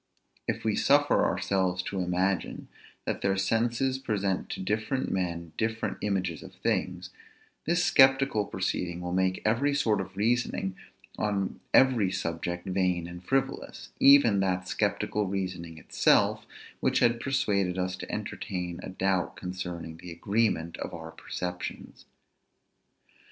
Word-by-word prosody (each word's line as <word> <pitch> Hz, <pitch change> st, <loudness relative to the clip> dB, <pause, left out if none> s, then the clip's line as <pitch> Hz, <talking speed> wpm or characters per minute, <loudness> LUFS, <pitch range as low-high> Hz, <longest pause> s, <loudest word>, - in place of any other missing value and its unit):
If -, -, -2 dB
we -, -, +1 dB
suffer -, -, +4 dB
ourselves 95 Hz, -2 st, 0 dB
to 95 Hz, -, -3 dB
imagine, 90 Hz, +1 st, -1 dB, 0.4 s
that -, -, -2 dB
their 95 Hz, 0 st, +1 dB
senses 120 Hz, +6 st, +1 dB
present 100 Hz, -6 st, -1 dB
to -, -, -5 dB
different 110 Hz, +7 st, -1 dB
men 85 Hz, -3 st, -2 dB
different 110 Hz, 0 st, -1 dB
images 95 Hz, -6 st, -1 dB
of -, -, -12 dB
things, -, -, -2 dB, 0.6 s
this 175 Hz, +2 st, +2 dB
sceptical 135 Hz, -5 st, +5 dB
proceeding 90 Hz, -2 st, -2 dB
will 90 Hz, 0 st, -3 dB
make 95 Hz, 0 st, +1 dB
every 135 Hz, +7 st, +2 dB
sort 110 Hz, -7 st, +2 dB
of 95 Hz, 0 st, -9 dB
reasoning 110 Hz, -3 st, 0 dB, 0.4 s
on 100 Hz, -3 st, -1 dB
every 120 Hz, -8 st, +5 dB
subject 85 Hz, +1 st, -3 dB
vain 90 Hz, -2 st, 0 dB
and 90 Hz, +1 st, -9 dB
frivolous, 135 Hz, +7 st, -2 dB
even 135 Hz, -7 st, +7 dB
that 90 Hz, -1 st, 0 dB
sceptical 105 Hz, +2 st, 0 dB
reasoning 90 Hz, -4 st, -4 dB
itself -, -, +2 dB, 0.3 s
which -, -, +1 dB
had 120 Hz, -1 st, +3 dB
persuaded 100 Hz, -9 st, +1 dB
us 90 Hz, 0 st, -1 dB
to -, -, -7 dB
entertain 90 Hz, -2 st, -4 dB
a -, -, -7 dB
doubt 95 Hz, -1 st, 0 dB
concerning 90 Hz, -3 st, -6 dB
the 90 Hz, +1 st, -9 dB
agreement 85 Hz, -2 st, 0 dB
of -, -, -5 dB
our 80 Hz, -1 st, -8 dB
perceptions. 90 Hz, +1 st, -6 dB
95 Hz, 130 wpm, -28 LUFS, 90-110 Hz, 0.6 s, even